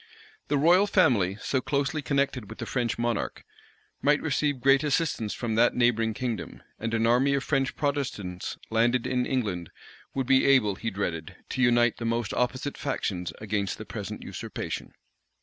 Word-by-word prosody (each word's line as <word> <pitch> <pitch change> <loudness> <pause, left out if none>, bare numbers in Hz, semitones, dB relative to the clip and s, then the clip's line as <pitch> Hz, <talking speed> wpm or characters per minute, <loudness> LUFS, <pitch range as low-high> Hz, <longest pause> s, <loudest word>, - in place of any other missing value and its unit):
The 145 - +1
royal 175 +7 +5
family, 120 - +3
so 130 - 0
closely 140 +3 -1
connected 135 -5 -1
with 110 - -9
the - - -5
French 120 -3 -1
monarch, 120 -2 -2 0.6
might 145 +1 +4
receive 145 -2 0
great 135 +2 +4
assistance 145 -7 0
from 115 -2 -2
that 115 +2 +4
neighboring 115 -2 +2
kingdom; 120 -3 -4 0.2
and 115 +1 -2
an 115 0 +2
army 130 +4 +3
of 135 - -1
French 135 -2 0
Protestants 125 - -3
landed 120 +2 +2
in 125 -1 0
England 100 - -2 0.5
would 135 -1 0
be 130 +1 +4
able, 130 -7 +4
he 115 +4 -3
dreaded, 90 -5 -4
to 130 - -2
unite 120 -1 +4
the 115 - -5
most 115 -1 -1
opposite 130 +3 -1
factions 95 -10 -2
against 100 -2 -2
the - - -8
present - - -6
usurpation. - - -6
125 Hz, 165 wpm, -27 LUFS, 110-140 Hz, 0.6 s, royal